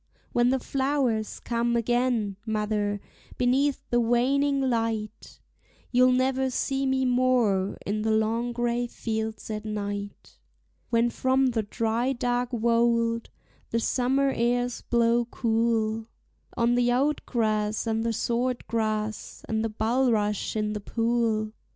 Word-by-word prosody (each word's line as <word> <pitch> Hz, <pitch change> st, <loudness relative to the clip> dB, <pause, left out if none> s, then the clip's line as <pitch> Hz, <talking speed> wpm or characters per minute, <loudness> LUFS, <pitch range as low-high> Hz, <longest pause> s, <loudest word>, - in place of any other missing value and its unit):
When 240 Hz, 0 st, +3 dB
the 265 Hz, -, +2 dB
flowers 265 Hz, -4 st, -1 dB
come 235 Hz, 0 st, -1 dB
again, 235 Hz, -3 st, +1 dB
mother, 210 Hz, -2 st, -1 dB, 0.4 s
beneath 265 Hz, +3 st, +1 dB
the 240 Hz, -, +3 dB
waning 270 Hz, +4 st, +2 dB
light 225 Hz, -4 st, -2 dB, 0.5 s
You'll 255 Hz, +1 st, +5 dB
never 260 Hz, +1 st, +1 dB
see 270 Hz, +1 st, -1 dB
me 265 Hz, 0 st, +1 dB
more 245 Hz, -6 st, +2 dB
in 210 Hz, +2 st, -1 dB
the 220 Hz, -, 0 dB
long 220 Hz, +2 st, +1 dB
gray 240 Hz, 0 st, -1 dB
fields 220 Hz, -1 st, -4 dB
at 210 Hz, 0 st, -4 dB
night; 205 Hz, -1 st, -5 dB, 0.5 s
When 235 Hz, 0 st, +2 dB
from 260 Hz, +1 st, +2 dB
the 230 Hz, -2 st, 0 dB
dry 230 Hz, +4 st, -1 dB
dark 245 Hz, 0 st, -1 dB
wold 230 Hz, 0 st, +1 dB, 0.4 s
the 230 Hz, -, 0 dB
summer 265 Hz, +3 st, +1 dB
airs 245 Hz, +1 st, 0 dB
blow 235 Hz, 0 st, +2 dB
cool 225 Hz, -1 st, 0 dB, 0.5 s
On 235 Hz, +1 st, +3 dB
the 245 Hz, 0 st, +2 dB
oat 280 Hz, +5 st, +1 dB
grass 215 Hz, -3 st, 0 dB
and 225 Hz, 0 st, 0 dB
the 230 Hz, -, 0 dB
sword 240 Hz, +2 st, -1 dB
grass, 215 Hz, -1 st, -3 dB
and 220 Hz, 0 st, -1 dB
the 225 Hz, -, -1 dB
bulrush 220 Hz, -2 st, 0 dB
in 210 Hz, -1 st, -1 dB
the 210 Hz, -, -4 dB
pool. 225 Hz, -1 st, 0 dB
235 Hz, 130 wpm, -26 LUFS, 220-250 Hz, 0.5 s, You'll